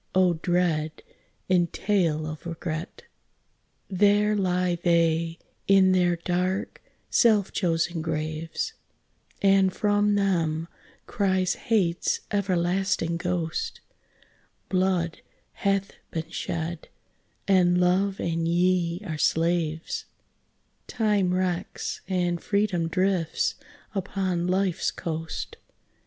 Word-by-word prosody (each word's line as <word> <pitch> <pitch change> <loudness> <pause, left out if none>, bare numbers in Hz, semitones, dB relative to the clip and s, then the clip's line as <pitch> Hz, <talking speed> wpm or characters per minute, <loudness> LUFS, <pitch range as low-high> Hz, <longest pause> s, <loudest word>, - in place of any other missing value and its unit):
oh, 185 -2 +4
dread 165 -2 0 0.4
entail 175 -3 +1
of 155 +2 -6
regret! 165 0 -5 0.8
There 205 +2 +3
lie 180 -3 0
they 165 -1 +2 0.3
in 195 -1 +6
their 180 -1 +3
dark, 180 +3 -2 0.3
self 215 -5 +4
chosen 170 -2 0
graves, 155 0 -3 0.7
And 195 -1 +5
from 205 +1 +2
them 165 -5 0 0.4
cries 185 -3 +1
Hate's 185 -7 0
everlasting 185 -3 0
ghost, 170 -2 -2 0.9
"Blood 185 -3 0 0.3
hath 195 0 0 0.2
been 165 0 -5
shed, 165 0 -4 0.6
and 180 -2 +4
Love 190 +2 +2
and 165 -1 -1
ye 175 +1 +1
are 155 -4 -4
slaves, 165 -1 0 0.8
Time 210 -5 +1
wrecks, 180 -1 -2
and 175 -2 0
freedom 200 -5 0
drifts 180 -1 0 0.4
upon 185 -3 -1
life's 185 -1 +1
coast." 160 -1 -5
180 Hz, 90 wpm, -26 LUFS, 165-195 Hz, 0.9 s, in